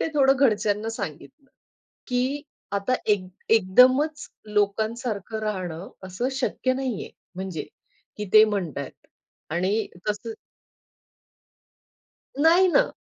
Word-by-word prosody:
ते -, -, 0 dB
थोडं 270 Hz, -1 st, +5 dB
घरच्यांना 215 Hz, -4 st, +2 dB
सांगितलं, 225 Hz, -, -7 dB, 0.6 s
की 260 Hz, +3 st, 0 dB, 0.3 s
आता 200 Hz, +5 st, 0 dB
एक 205 Hz, -3 st, +3 dB, 0.3 s
एकदमच 255 Hz, +9 st, +4 dB, 0.2 s
लोकांसारखं 215 Hz, +1 st, -1 dB
राहणं 185 Hz, -4 st, -4 dB
असं 190 Hz, +8 st, -3 dB
शक्य 260 Hz, -1 st, -1 dB
नाहीये 255 Hz, -5 st, -3 dB, 0.3 s
म्हणजे 185 Hz, -5 st, -5 dB, 0.5 s
की 210 Hz, -, -3 dB
ते 215 Hz, 0 st, +10 dB
म्हणतायेत 175 Hz, -10 st, -4 dB, 0.4 s
आणि 190 Hz, +6 st, 0 dB, 0.2 s
तसं 210 Hz, +2 st, -3 dB, 2.1 s
नाही 345 Hz, +4 st, +6 dB
ना. -, -, +3 dB
220 Hz, 95 wpm, -25 LUFS, 195-260 Hz, 2.1 s, ते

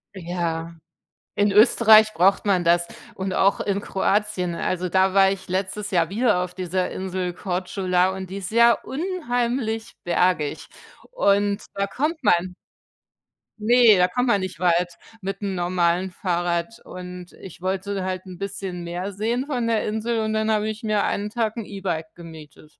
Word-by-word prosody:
Ja. 170 Hz, -2 st, -3 dB, 0.6 s
In 205 Hz, 0 st, +2 dB
Österreich 215 Hz, 0 st, +6 dB
braucht 195 Hz, +4 st, +3 dB
man 185 Hz, -3 st, +2 dB
das 170 Hz, 0 st, +3 dB, 0.3 s
und 190 Hz, 0 st, -3 dB
auch 195 Hz, +2 st, +2 dB
in 200 Hz, -1 st, -1 dB
Kroatien. 195 Hz, -2 st, 0 dB
Also, 180 Hz, +1 st, -2 dB
da 190 Hz, +1 st, +3 dB
war 195 Hz, -1 st, +5 dB
ich 195 Hz, -1 st, -6 dB
letztes 190 Hz, +3 st, -3 dB
Jahr 170 Hz, -2 st, +2 dB
wieder 215 Hz, -2 st, +2 dB
auf 180 Hz, 0 st, -7 dB
dieser 185 Hz, 0 st, -2 dB
Insel 185 Hz, -1 st, -3 dB
Korčula 185 Hz, 0 st, 0 dB
und 190 Hz, -1 st, -7 dB
die 195 Hz, -, -6 dB
ist 195 Hz, -1 st, -6 dB
ja 235 Hz, +1 st, +6 dB
unheimlich 245 Hz, -, -2 dB
bergig, 175 Hz, -4 st, 0 dB, 0.5 s
und 200 Hz, -, +2 dB
da 200 Hz, 0 st, -1 dB
kommt 305 Hz, -, -2 dB
man 180 Hz, +1 st, +2 dB, 1.1 s
ne, 225 Hz, -1 st, +6 dB
da 180 Hz, -, +4 dB
kommt 245 Hz, +7 st, -1 dB
man 205 Hz, -5 st, +3 dB
nicht 185 Hz, -4 st, -5 dB
weit 175 Hz, 0 st, +1 dB, 0.2 s
mit 195 Hz, +1 st, -5 dB
'nem 195 Hz, -2 st, -2 dB
normalen 175 Hz, +1 st, 0 dB
Fahrrad 175 Hz, +2 st, -2 dB
und 180 Hz, -1 st, -9 dB
ich 190 Hz, -, -11 dB
wollte 190 Hz, +1 st, -2 dB
halt 185 Hz, 0 st, -4 dB
'n 180 Hz, -, -9 dB
bisschen 190 Hz, -2 st, -5 dB
mehr 175 Hz, +3 st, -4 dB
sehen 230 Hz, +6 st, -1 dB
von 250 Hz, -5 st, -1 dB
der 225 Hz, -2 st, 0 dB
Insel 225 Hz, +2 st, -1 dB
und 220 Hz, 0 st, -1 dB
dann 220 Hz, 0 st, +1 dB
habe 215 Hz, 0 st, +1 dB
ich 215 Hz, +1 st, -6 dB
mir 215 Hz, -2 st, +1 dB
1 210 Hz, +1 st, -2 dB
Tag 225 Hz, -1 st, -1 dB
'n 225 Hz, -, -4 dB
E-Bike 175 Hz, -6 st, -4 dB
gemietet. 160 Hz, -2 st, -13 dB
190 Hz, 165 wpm, -23 LUFS, 180-215 Hz, 1.1 s, Österreich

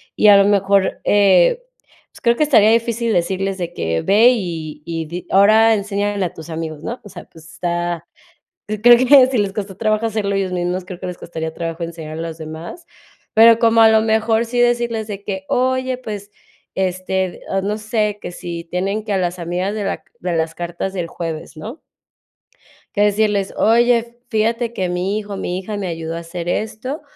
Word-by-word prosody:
y 210 Hz, -, +5 dB
a 200 Hz, -, +9 dB
lo 200 Hz, -, +5 dB
mejor, 195 Hz, -1 st, +2 dB
eh, 200 Hz, -, +4 dB, 0.5 s
pues, -, -, -17 dB
creo 235 Hz, 0 st, +4 dB
que 305 Hz, -, +2 dB
estaría 220 Hz, -7 st, +5 dB
difícil 230 Hz, 0 st, +1 dB
decirles 190 Hz, +2 st, -1 dB
de 175 Hz, -, -4 dB
que: 80 Hz, -1 st, -1 dB
"Ve, 215 Hz, -, +5 dB
y 165 Hz, -9 st, -4 dB
y 165 Hz, -1 st, -4 dB
di 175 Hz, +3 st, -7 dB
ahora 220 Hz, +3 st, +5 dB
enséñale 205 Hz, -1 st, -1 dB
a 170 Hz, -, -5 dB
tus 160 Hz, +1 st, -11 dB
amigos", 160 Hz, -1 st, -5 dB
¿no? 240 Hz, -, -5 dB
O 205 Hz, -, -12 dB
sea, -, -, -10 dB
pues, 160 Hz, -1 st, -17 dB
está 175 Hz, -1 st, -3 dB, 0.6 s
creo 220 Hz, +3 st, +6 dB
que 255 Hz, +1 st, +6 dB
si 260 Hz, -1 st, -2 dB
les 200 Hz, -2 st, 0 dB
costó 195 Hz, -2 st, -5 dB
trabajo 215 Hz, +1 st, 0 dB
hacerlo 205 Hz, -2 st, -1 dB
ellos 195 Hz, -1 st, -1 dB
mismos, 180 Hz, +1 st, -2 dB
creo 180 Hz, -2 st, -8 dB
que 185 Hz, -, -5 dB
les 180 Hz, -1 st, -6 dB
costaría 160 Hz, -1 st, -5 dB
trabajo 165 Hz, +1 st, -5 dB
enseñar 165 Hz, -2 st, -6 dB
a -, -, -4 dB
los 165 Hz, -1 st, -6 dB
demás. 160 Hz, -, -8 dB, 0.5 s
Pero 225 Hz, +1 st, +7 dB
como 230 Hz, -1 st, +4 dB
a 220 Hz, -, +7 dB
lo 220 Hz, 0 st, +5 dB
mejor 220 Hz, +1 st, +1 dB
sí 245 Hz, +1 st, -3 dB
decirles 235 Hz, -2 st, +1 dB
de 200 Hz, -1 st, -6 dB
que: 190 Hz, -1 st, -4 dB
"Oye, 260 Hz, 0 st, 0 dB
pues, 205 Hz, -4 st, -7 dB, 0.5 s
este, 185 Hz, 0 st, -2 dB
o 195 Hz, -, +1 dB
no 205 Hz, +2 st, -1 dB
sé, 210 Hz, -1 st, -1 dB
que -, -, -6 dB
si 170 Hz, -1 st, -6 dB
tienen 195 Hz, +5 st, -2 dB
que 210 Hz, -, -3 dB
a 195 Hz, -, +1 dB
las 180 Hz, 0 st, -2 dB
amigas 180 Hz, +4 st, -2 dB
de 210 Hz, -2 st, -3 dB
la -, -, -1 dB
c -, -, -34 dB, 0.2 s
de 180 Hz, 0 st, -2 dB
las 160 Hz, 0 st, -1 dB
cartas 175 Hz, +3 st, -4 dB
del 175 Hz, -3 st, -3 dB
jueves", 165 Hz, -1 st, -6 dB
¿no? 230 Hz, -, -8 dB, 1.1 s
Que 205 Hz, -, +1 dB
decirles: 205 Hz, -1 st, +1 dB
"Oye, 235 Hz, +1 st, +3 dB
fíjate 230 Hz, +2 st, 0 dB
que 185 Hz, -4 st, -2 dB
mi 180 Hz, +3 st, -1 dB
hijo, 205 Hz, -2 st, -7 dB
mi 180 Hz, -1 st, -3 dB
hija 205 Hz, +2 st, -5 dB
me 195 Hz, -2 st, -3 dB
ayudó 165 Hz, -1 st, -4 dB
a 170 Hz, -, -4 dB
hacer 170 Hz, +1 st, -7 dB
esto, 220 Hz, -, -3 dB
200 Hz, 200 wpm, -19 LUFS, 175-220 Hz, 1.1 s, a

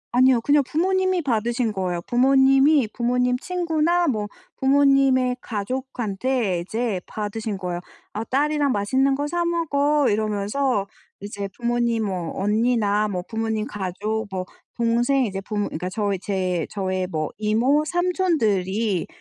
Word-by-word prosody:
아니요. 255 Hz, -1 st, +5 dB
그냥 290 Hz, +4 st, +4 dB
부모님이 375 Hz, +5 st, +1 dB
받으신 235 Hz, -3 st, 0 dB
거예요. 180 Hz, -3 st, -2 dB
부모님이 270 Hz, -, +4 dB
부모님 250 Hz, +1 st, +1 dB
친구나 345 Hz, +1 st, 0 dB
뭐 215 Hz, -7 st, -1 dB, 0.3 s
부모님의 270 Hz, -2 st, +3 dB
가족한테 235 Hz, -2 st, -2 dB
이제 215 Hz, +3 st, -2 dB
받으신 215 Hz, 0 st, -4 dB
거예요. 180 Hz, -2 st, -4 dB, 0.3 s
"아 215 Hz, -, -3 dB
딸이랑 290 Hz, +1 st, +1 dB
맛있는 260 Hz, +7 st, +1 dB
거 290 Hz, +1 st, -2 dB
사 345 Hz, +2 st, -1 dB
먹어." 300 Hz, -4 st, +1 dB
이러면서 210 Hz, +2 st, 0 dB, 0.4 s
이제 200 Hz, 0 st, -5 dB
부모님 235 Hz, -1 st, 0 dB
뭐 180 Hz, -4 st, -3 dB
언니나 215 Hz, -1 st, +2 dB
뭐 185 Hz, -3 st, -3 dB
부모님 220 Hz, -1 st, -2 dB
가족 210 Hz, 0 st, -3 dB
뭐 185 Hz, -1 st, -3 dB, 0.3 s
동생 240 Hz, +3 st, +2 dB
이제 195 Hz, -3 st, -4 dB
부모 205 Hz, +1 st, -3 dB
그니까 180 Hz, +3 st, -4 dB
저희 200 Hz, -1 st, -1 dB
제 185 Hz, -4 st, -2 dB
저의 185 Hz, -2 st, -2 dB
뭐 155 Hz, -4 st, -2 dB
이모 235 Hz, +8 st, +2 dB
삼촌들이 230 Hz, -, 0 dB
235 Hz, 295 characters per minute, -23 LUFS, 205-275 Hz, 0.4 s, 아니요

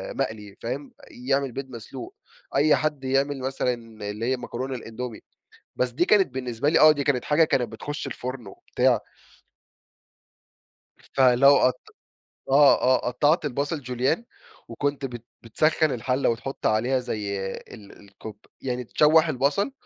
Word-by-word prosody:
مقلي، 105 Hz, -2 st, -4 dB
فاهم، 130 Hz, +5 st, -5 dB, 0.2 s
يعمل 135 Hz, +2 st, -1 dB
بيض 135 Hz, +2 st, -6 dB
مسلوق، 240 Hz, -, -9 dB, 0.4 s
أي 150 Hz, +1 st, +5 dB
حد 150 Hz, -3 st, -2 dB
يعمل 135 Hz, +1 st, 0 dB
مثلًا 130 Hz, -1 st, -1 dB, 0.4 s
اللي 105 Hz, +2 st, -4 dB
هي 130 Hz, +1 st, 0 dB
مكرونة 130 Hz, +2 st, -5 dB
الأندومي، 115 Hz, -1 st, -7 dB, 0.6 s
بس 125 Hz, -, 0 dB
دي 165 Hz, +9 st, +1 dB
كانت 200 Hz, -3 st, +4 dB
بالنسبة 125 Hz, +2 st, -1 dB
لي -, -, +3 dB
آه، 155 Hz, -, +8 dB
دي 145 Hz, -2 st, -1 dB
كانت 135 Hz, -3 st, 0 dB
حاجة 150 Hz, +2 st, +4 dB
كانت 125 Hz, -7 st, 0 dB
بتخش 145 Hz, +7 st, -6 dB
الفُرن 125 Hz, -3 st, -6 dB
وبتاع 125 Hz, +4 st, 0 dB, 2.0 s
فلو 135 Hz, +2 st, +4 dB
قط 125 Hz, 0 st, +2 dB, 0.7 s
آه، 140 Hz, +1 st, +6 dB
آه، 130 Hz, 0 st, +2 dB
قطعت 150 Hz, +7 st, +2 dB
البصل 145 Hz, +3 st, -2 dB
جوليان 125 Hz, -, -1 dB, 0.4 s
وكنت 140 Hz, +4 st, -2 dB
بت 120 Hz, -3 st, -8 dB, 0.2 s
بتسخن 155 Hz, +6 st, +1 dB
الحلة 125 Hz, +2 st, 0 dB
وتحط 125 Hz, +4 st, -4 dB
عليها 120 Hz, +5 st, +1 dB
زي 105 Hz, -5 st, -4 dB, 0.2 s
ال 105 Hz, -4 st, -13 dB
الكوب 100 Hz, +1 st, -12 dB, 0.2 s
يعني 125 Hz, -1 st, -3 dB
تشوح 155 Hz, +6 st, +4 dB
البصل 145 Hz, -, 0 dB
130 Hz, 135 wpm, -25 LUFS, 120-145 Hz, 2.0 s, آه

